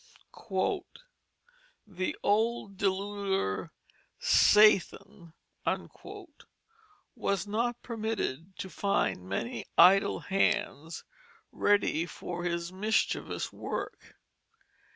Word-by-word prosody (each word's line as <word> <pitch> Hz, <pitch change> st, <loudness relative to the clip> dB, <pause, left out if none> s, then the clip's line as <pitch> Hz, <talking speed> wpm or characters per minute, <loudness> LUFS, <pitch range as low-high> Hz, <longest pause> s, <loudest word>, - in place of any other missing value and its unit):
"The 185 Hz, -2 st, -3 dB
old 215 Hz, -1 st, +1 dB
deluder 195 Hz, -, -1 dB, 0.5 s
Sathan" 210 Hz, -, +4 dB, 1.8 s
was 200 Hz, -1 st, -1 dB
not 235 Hz, +3 st, -1 dB
permitted 215 Hz, -, -4 dB
to 190 Hz, -, -5 dB
find 95 Hz, -, -1 dB
many 235 Hz, -, -3 dB
idle 195 Hz, +3 st, +6 dB
hands 165 Hz, -4 st, -1 dB, 0.5 s
ready 200 Hz, -5 st, +2 dB
for 175 Hz, +2 st, -6 dB
his 170 Hz, 0 st, -2 dB
mischievous 215 Hz, +4 st, -1 dB
work. -, -, -6 dB
195 Hz, 70 wpm, -30 LUFS, 175-210 Hz, 1.8 s, idle